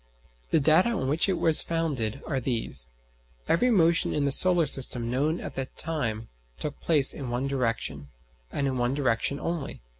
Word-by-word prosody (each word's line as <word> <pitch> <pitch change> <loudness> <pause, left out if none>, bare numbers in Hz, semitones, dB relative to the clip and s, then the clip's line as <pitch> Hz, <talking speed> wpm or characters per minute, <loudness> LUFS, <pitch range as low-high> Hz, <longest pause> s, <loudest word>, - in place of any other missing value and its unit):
The 160 - +2
data 160 +9 +3
on 225 - -2
which 155 +7 +2
it 190 - 0
was 160 -2 +5
founded 140 -8 -3
are 135 -4 -2
these: 115 - -3 0.6
Every 245 +10 +2
motion 170 -7 +3
in 145 - 0
the 140 - 0
solar 175 +2 +4
system 125 -4 +2
known 150 +6 -1
at - - -7
that 135 -1 -7
time 115 -9 -3 0.3
took 150 - -5
place 150 -5 +4
in 135 -4 -7
one 120 +2 -2
direction, 115 - -3 0.4
and 140 - -2
in 130 -2 -2
one 120 +2 0
direction 140 0 0
only. 165 -4 -5
140 Hz, 175 wpm, -26 LUFS, 125-165 Hz, 0.6 s, was